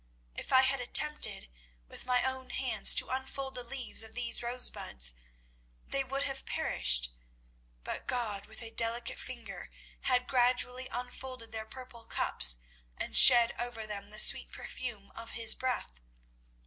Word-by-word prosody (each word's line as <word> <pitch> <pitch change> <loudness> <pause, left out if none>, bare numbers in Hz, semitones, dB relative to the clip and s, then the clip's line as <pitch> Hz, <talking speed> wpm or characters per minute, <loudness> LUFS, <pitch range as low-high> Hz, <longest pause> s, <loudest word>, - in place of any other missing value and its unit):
If - - -6
I 260 0 +6
had 270 0 +1
attempted 300 - +3 0.4
with - - -10
my 250 -1 +2
own 260 0 -3
hands 260 -2 +3
to - - 0
unfold 265 +1 -4
the 250 - -6
leaves 245 -1 -2
of 220 0 -7
these 240 -1 -2
rosebuds, 235 - 0 0.7
they 275 - -2
would 270 +1 -3
have 270 -1 -4
perished; - - 0 0.7
but - - -6
God 235 -7 -3
with 220 +2 -9
a 225 - -6
delicate 230 +1 0
finger 235 -6 -8 0.4
had 250 -1 +2
gradually 250 0 0
unfolded 250 -1 -7
their 220 -1 -6
purple 240 -1 -12
cups 60 - +4 0.4
and - - -4
shed 240 -2 +8
over 240 -2 -5
them 205 -1 -7
the 215 - -10
sweet - - +6
perfume 225 -6 -7
of 230 0 -9
His 230 -2 +3
breath. 245 - -4
245 Hz, 150 wpm, -31 LUFS, 225-260 Hz, 0.7 s, shed